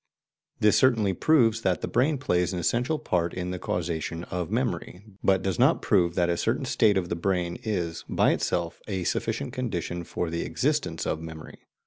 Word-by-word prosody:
This 105 -1 +4
certainly 115 -7 +3
proves 115 - +3
that 95 -5 0
the - - -2
brain 145 +4 +2
plays 90 -9 0
an 90 - -2
essential 125 - +1
part 90 - -1
in 90 0 -3
the 90 - -4
causation 85 -1 -3
of 90 -2 -2
memory, 105 -5 -2 0.2
but 95 -1 +3
does 95 -4 -1
not - - +4
prove 85 -1 +2
that 90 -2 +2
a 85 0 0
certain - - 0
state 105 -3 +3
of 90 -2 -1
the 85 - -1
brain 90 -1 -1
is, 85 -6 -2
by - - +3
itself, 85 -1 -1
a 95 -4 -2
sufficient 115 +8 -2
condition 90 -9 -3
for 85 0 -3
the 85 - -2
existence - - -1
of 80 - -2
memory. 80 -1 -9
90 Hz, 185 wpm, -26 LUFS, 85-115 Hz, 0.2 s, This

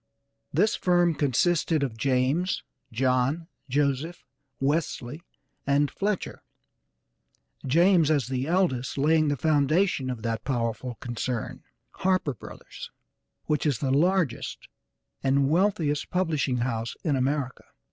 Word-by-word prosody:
This 200 +9 +2
firm 175 -2 +3
consisted 155 +2 +1
of 125 -5 -2
James, 135 +9 0 0.3
John, 130 +6 +1 0.2
Joseph, 145 +4 0 0.4
Wesley 145 -1 -1 0.5
and 140 +1 +2
Fletcher; 205 -1 -2 1.3
James, 170 +2 +4
as 145 -4 +2
the 130 +1 -2
eldest, 165 -9 0
laying 155 +2 +3
the 145 -1 0
foundation 155 +1 +2
of 120 -4 -5
that 115 -1 -2
powerful 120 -1 -2
concern, 120 0 -4 0.4
Harper 185 -6 +1
Brothers, 110 - -10 0.6
which 150 0 0
is 140 -5 +1
the 135 -2 -1
largest 170 -1 0 0.5
and 135 +1 +2
wealthiest 165 -5 +1
publishing 155 -8 0
house 115 -2 -2
in 150 -5 +1
America. 135 0 -1
145 Hz, 110 wpm, -26 LUFS, 130-165 Hz, 1.3 s, James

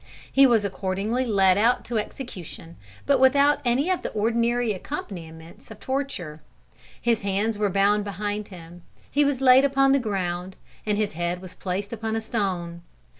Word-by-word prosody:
He 275 0 +6
was 225 -4 +3
accordingly 200 +6 -2
led 195 -3 +4
out 240 +3 +2
to 235 -2 -1
execution, 180 - -8 0.3
but 280 -2 +3
without 280 +2 +4
any 265 +8 +1
of 370 - 0
the - - -4
ordinary 235 +1 +1
accompaniments 170 - -8
of 220 -1 -11
torture. 235 - -4 0.6
His 230 -2 +1
hands 200 +3 -1
were 205 0 0
bound 200 +2 +2
behind 205 +1 -4
him, 175 -2 -12 0.3
he 290 - +3
was 280 -2 0
laid 260 0 +7
upon 275 -1 +3
the 275 - +4
ground, 185 -5 -3 0.3
and 210 -1 +1
his 210 -4 -1
head 175 +2 -2
was 185 -1 -11
placed 195 +3 -4
upon 220 0 -3
a 225 - -1
stone. 185 -6 -3
210 Hz, 165 wpm, -24 LUFS, 185-245 Hz, 0.6 s, laid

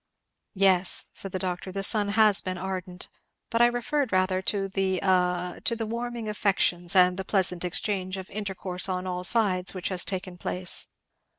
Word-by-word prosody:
"Yes," 190 -2 +2
said 195 - -7
the 185 - -2
doctor, 185 0 -4
"the 195 +1 -4
sun 205 0 +3
has 210 -1 +4
been 185 -1 -4
ardent; 185 -1 -5 0.4
but 230 0 +2
I 240 - +7
referred 245 +2 -1
rather 185 0 +1
to 195 0 -1
the 190 -1 -1
a 180 -1 0
to 230 - +1
the 225 -1 -3
warming 235 0 -4
of 210 - -3
affections, 180 -3 +2
and 180 0 +5
the 190 - -3
pleasant 185 -3 +1
exchange 185 +1 -2
of 190 -1 -7
intercourse 190 -2 -2
on 185 0 -2
all 180 -1 -3
sides 190 -3 +3
which 185 - -3
has 185 -2 +2
taken 185 -2 -4
place. 180 0 0
190 Hz, 180 wpm, -26 LUFS, 180-205 Hz, 0.4 s, I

